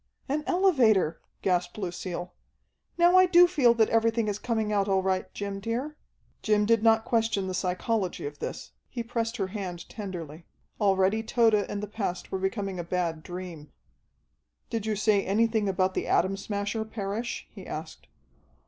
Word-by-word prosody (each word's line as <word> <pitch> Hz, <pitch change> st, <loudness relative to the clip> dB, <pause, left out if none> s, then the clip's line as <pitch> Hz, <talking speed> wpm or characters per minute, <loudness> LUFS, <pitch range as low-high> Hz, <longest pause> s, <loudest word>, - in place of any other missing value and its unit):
"An 300 Hz, +2 st, -1 dB
elevator!" 245 Hz, -, +3 dB, 0.2 s
gasped 180 Hz, 0 st, 0 dB
Lucille. 180 Hz, -2 st, -5 dB, 0.6 s
"Now 350 Hz, +1 st, +6 dB
I 370 Hz, -, +6 dB
do 355 Hz, 0 st, +7 dB
feel 275 Hz, -10 st, +4 dB
that 220 Hz, -2 st, +3 dB
everything 225 Hz, 0 st, +2 dB
is 205 Hz, 0 st, -2 dB
coming 220 Hz, -3 st, -1 dB
out 200 Hz, -1 st, +2 dB
all 190 Hz, -1 st, +2 dB
right, 190 Hz, -1 st, -1 dB
Jim, 200 Hz, -1 st, -4 dB
dear." 240 Hz, +8 st, -3 dB, 0.5 s
Jim 210 Hz, -1 st, +2 dB
did 230 Hz, 0 st, +3 dB
not 225 Hz, 0 st, +4 dB
question 225 Hz, -4 st, +1 dB
the 185 Hz, -, -3 dB
psychology 185 Hz, +1 st, -1 dB
of 145 Hz, 0 st, -6 dB
this. -, -, -6 dB, 0.2 s
He 240 Hz, -2 st, -4 dB
pressed 230 Hz, 0 st, -2 dB
her 195 Hz, -2 st, -2 dB
hand 185 Hz, -4 st, -6 dB
tenderly. 170 Hz, -6 st, -7 dB, 0.3 s
Already 195 Hz, +1 st, +3 dB
Tode 225 Hz, 0 st, +3 dB
and 205 Hz, 0 st, 0 dB
the -, -, -3 dB
past 200 Hz, -4 st, -4 dB
were 190 Hz, -, -1 dB
becoming 195 Hz, -1 st, -2 dB
a -, -, -2 dB
bad 170 Hz, -2 st, -2 dB
dream. 175 Hz, -3 st, -8 dB, 1.0 s
"Did 225 Hz, -2 st, -2 dB
you 215 Hz, -, 0 dB
say 205 Hz, -1 st, +2 dB
anything 220 Hz, +1 st, +1 dB
about 185 Hz, 0 st, +1 dB
the -, -, -2 dB
Atom 190 Hz, +1 st, +2 dB
Smasher, 205 Hz, +2 st, -3 dB
Parrish?" 220 Hz, +1 st, -4 dB
he -, -, -11 dB
asked. -, -, -7 dB
205 Hz, 165 wpm, -28 LUFS, 185-230 Hz, 1.0 s, do